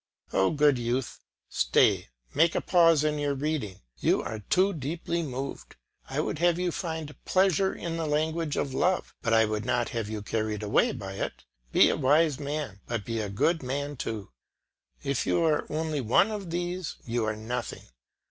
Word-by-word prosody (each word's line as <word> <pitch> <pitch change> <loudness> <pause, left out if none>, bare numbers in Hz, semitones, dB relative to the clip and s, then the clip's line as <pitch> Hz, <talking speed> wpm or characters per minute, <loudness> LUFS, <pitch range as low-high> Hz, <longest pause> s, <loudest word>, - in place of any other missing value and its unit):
Oh, 95 - +3
good 145 -4 +3
youth, 120 +2 -2 0.3
stay, - - +3 0.3
make 160 +3 +3
a - - +3
pause 165 -4 +4
in 150 -1 0
your 145 -1 0
reading, 135 -10 -3 0.2
you - - +2
are 110 - -5
too 185 - +2
deeply 165 +3 -3
moved; 135 -2 -5 0.3
I - - -2
would - - -3
have 175 0 +3
you 180 -1 0
find 160 -4 -4
pleasure 190 0 +3
in 165 -1 -4
the 165 -1 -2
language 155 +1 0
of 135 - -1
love, 180 +6 +1
but 115 - -1
I 110 0 +5
would 105 0 -2
not 120 0 0
have 115 -3 -3
you 110 -2 -4
carried 110 0 -2
away 105 - +3
by 95 -7 -6
it; - - -4 0.3
be - - +6
a - - -1
wise 150 +1 +3
man, 145 -8 -4
but 115 -4 -3
be 115 -1 -2
a 105 -2 -2
good 160 - +1
man 140 +3 -3
too. 110 - -5 0.7
If 140 -3 -1
you 170 - +2
are 155 -2 +2
only 155 -1 -1
one 130 - +3
of 200 -4 -5
these, 175 0 -3
you 120 -1 -1
are 110 0 -1
nothing. 110 +3 -4
145 Hz, 185 wpm, -28 LUFS, 115-165 Hz, 0.7 s, be